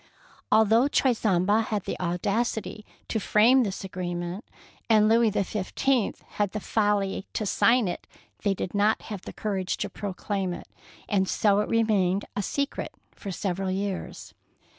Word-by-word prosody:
Although 220 +4 +5
Choiseul 220 -10 +2
had 210 0 +1
the - - -3
audacity 210 +5 -2 0.2
to 220 - -1
frame 230 +6 +5
this 200 -5 -2
agreement, 180 +1 -4 0.5
and 215 -1 +5
Louis 225 +1 +4
XV 210 +5 -1
had 205 -2 -2
the 215 - -2
folly 205 -2 0
to 215 - -2
sign 235 +2 +3
it, 175 - -5 0.3
they 200 -2 +1
did 180 - -4
not 210 +2 +3
have 200 - -6
the - - -8
courage 190 -3 -2
to - - -3
proclaim 195 -2 -3
it, - - -9 0.4
and 190 -2 +1
so 205 -1 +3
it 210 - -1
remained 205 -4 +2
a 205 - 0
secret 280 +8 -3 0.2
for 200 - -8
several 190 +1 -2
years. 190 0 -4
205 Hz, 145 wpm, -26 LUFS, 190-220 Hz, 0.5 s, Although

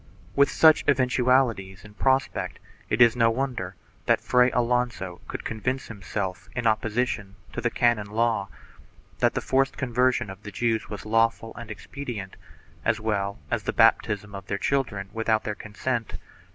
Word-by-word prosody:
With 140 0 +5
such 160 -1 +5
eventualities 125 -7 +2
in 105 - -13
prospect 130 +4 0 0.3
it 120 +3 +6
is 120 0 +5
no 115 -1 +4
wonder 115 -7 -2 0.3
that - - +4
Fray 125 0 +4
Alonso 120 -7 -1
could - - -6
convince 130 +4 -3
himself, 95 -3 -5
in 120 -1 -2
opposition 110 -2 0 0.2
to - - -3
the - - +1
canon 120 -4 +2
law, 110 -2 0 0.7
that - - +2
the - - 0
forced 135 0 +1
conversion 125 -3 +1
of 95 +1 -11
the 105 - -8
Jews 115 +2 -1
was 105 -1 -7
lawful 115 +1 +1
and 120 -1 -8
expedient, 110 -3 -7 0.5
as 115 0 +1
well 100 -2 -1
as - - +1
the - - -3
baptism 105 0 +3
of 100 - -8
their 100 - -1
children 100 -6 -1
without 110 -1 +1
their 105 - -2
consent. 110 +3 -3
115 Hz, 155 wpm, -26 LUFS, 105-125 Hz, 0.7 s, it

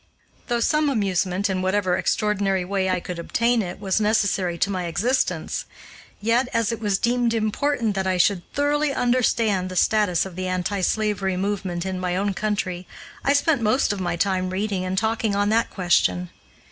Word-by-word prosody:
Though 240 -1 0
some 300 +4 +2
amusement, 195 -4 0
in 190 -2 -1
whatever 185 -1 +1
extraordinary 200 -3 0
way 190 0 -1
I 185 -1 +1
could 175 0 -6
obtain 235 +7 +1
it, 180 -2 -6
was 200 +1 0
necessary 200 -5 +1
to 195 +4 0
my 185 -2 -2
existence, 215 +11 -1 0.5
yet, 230 +4 +2
as 230 -2 +1
it 230 - -4
was 205 -3 +1
deemed 240 +1 +1
important 225 +1 0
that 190 -1 -2
I 185 -1 +1
should 180 +1 +3
thoroughly 290 0 +1
understand 230 -6 +1
the 185 - -7
status 200 -2 +2
of 190 -3 -9
the 185 0 -3
anti 185 +2 -1
slavery 195 -2 0
movement 190 -3 -2
in 190 -1 -3
my 180 -1 -1
own 200 +1 0
country, 190 -3 -2 0.4
I 280 - +3
spent 285 -2 +2
most 220 +1 +2
of 195 - -5
my 175 -2 -1
time 185 +1 0
reading 195 0 -2
and 185 +1 -2
talking 220 0 0
on 205 +1 +1
that 225 +2 +2
question. 90 - +1
200 Hz, 180 wpm, -23 LUFS, 185-225 Hz, 0.5 s, should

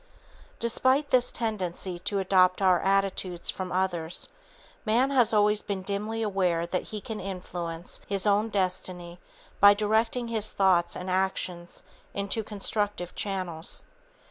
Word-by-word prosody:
Despite 260 +5 +2
this 250 -1 +4
tendency 185 -5 -2
to 200 +3 -2
adopt 185 -1 +4
our 185 -3 +4
attitudes 195 -2 +1
from 185 -1 -5
others, 180 -3 -1 0.5
man 245 +5 +2
has 245 -5 +4
always 210 -1 +3
been 195 -2 -4
dimly 210 +3 -2
aware 185 -5 +1
that 180 +1 -2
he 215 - -4
can 215 +1 -6
influence 175 -3 -5
his 200 -1 0
own 210 +2 +3
destiny 185 -3 -2 0.4
by 200 0 +8
directing 220 +3 +1
his 215 -2 -1
thoughts 185 -3 +3
and 180 - -6
actions 185 -2 -2 0.3
into 200 +3 -1
constructive 205 -3 -2
channels. 185 -5 -3
195 Hz, 130 wpm, -27 LUFS, 180-215 Hz, 0.5 s, by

